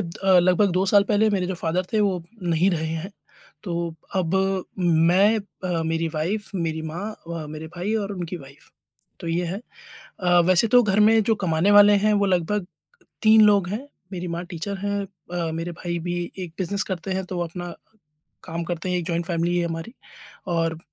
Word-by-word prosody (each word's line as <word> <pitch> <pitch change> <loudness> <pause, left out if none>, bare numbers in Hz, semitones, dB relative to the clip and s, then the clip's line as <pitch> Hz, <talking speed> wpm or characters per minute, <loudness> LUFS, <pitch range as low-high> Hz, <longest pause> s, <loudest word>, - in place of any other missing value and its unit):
अ, 185 +1 +2
लगभग 185 +2 +3
2 185 +2 +2
साल 200 +1 +5
पहले 215 +1 +3
मेरे 185 -3 0
जो 190 - -2
फादर 175 +1 -1
थे 215 - +2
वो 190 -4 +1 0.2
नहीं 175 +2 +2
रहे 160 -2 -1
हैं, 165 +4 -4 0.5
तो 170 -3 -3 0.2
अब 185 -1 0 0.4
मैं 175 +5 +4 0.3
अ, 175 -2 0
मेरी 165 0 0
वाइफ 195 +7 -2
मेरी 160 -3 -2
माँ 160 +4 -5
अ, - - -14
व 165 -2 -4
मेरे 155 +1 -7
भाई 195 +5 -1
और 205 -2 -1
उनकी 180 -1 -5
वाइफ 140 -1 -15 0.5
तो 170 - -5
ये 170 +2 0
है। 190 +4 -3 0.6
अ, 175 -1 +4
वैसे 185 +4 +4
तो 245 +2 +6
घर 210 -2 +2
में 220 +1 +5
जो 220 +1 +2
कमाने 165 +3 +2
वाले 205 0 +8
हैं 215 - +4
वो 200 0 +2
लगभग 185 +1 0 0.6
3 220 0 +7
लोग 200 -4 +4
हैं, 225 +8 -4 0.3
मेरी 180 -1 -4
माँ 175 - -4
टीचर 190 +4 -4
हैं 200 +1 -1 0.3
अ, 170 -2 -1
मेरे 165 +2 -4
भाई 170 0 -4
भी 175 +1 -3 0.2
एक 180 -3 -6
बिज़नेस 195 +2 -1
करते 185 +2 -4
हैं, 190 0 -2
तो 180 -1 -4
अपना 175 0 -5 0.7
काम 170 -1 -4
करते 175 +1 -3
हैं 180 - +1
एक 175 - -3
जॉइन्ट 170 0 -1
फैमिली 170 0 0
है 170 - +1
हमारी 165 +8 -6 0.6
और 165 -1 0
180 Hz, 195 wpm, -24 LUFS, 165-200 Hz, 0.7 s, वाले